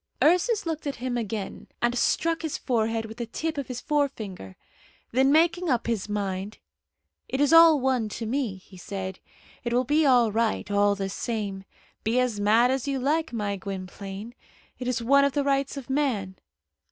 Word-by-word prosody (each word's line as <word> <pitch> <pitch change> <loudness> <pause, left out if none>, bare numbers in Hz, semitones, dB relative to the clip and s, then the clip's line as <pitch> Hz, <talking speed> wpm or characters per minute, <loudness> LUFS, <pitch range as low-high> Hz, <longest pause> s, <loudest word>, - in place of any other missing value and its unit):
Ursus 365 +7 +3
looked 320 -2 -3
at 280 - -2
him 250 0 -3
again, 220 -4 -4
and 240 0 +1
struck 330 +6 +1
his 320 -3 -3
forehead 225 -2 0
with 220 +1 -9
the 235 -2 -4
tip 320 +7 -3
of 275 - -4
his 250 -2 -5
forefinger. 220 - -2 0.6
Then 265 +3 +3
making 335 +3 +3
up 245 -3 +1
his 220 -3 -2
mind, 200 -1 -3 0.7
"It 265 - -2
is 290 +2 +3
all 330 -2 +8
one 255 -4 0
to 230 - -4
me," 240 -3 -1
he 185 0 -15
said. 190 +1 -6 0.4
"It 235 - -2
will 250 +1 +3
be 295 +5 +2
all 245 -5 +4
right, 220 -1 0
all 205 0 +3
the 195 -1 -3
same. 200 -2 -4 0.4
Be 230 +3 +1
as 245 -5 0
mad 225 +5 +4
as 265 +1 -1
you 275 -1 0
like, 300 +4 0
my 205 -4 -2
Gwynplaine. 195 +3 -7 0.5
It 250 - -4
is 245 -2 -1
one 280 +4 +5
of 280 -1 +2
the 285 - +1
rights 275 0 0
of 270 - -7
man. 245 -10 -1
240 Hz, 185 wpm, -26 LUFS, 205-280 Hz, 0.7 s, all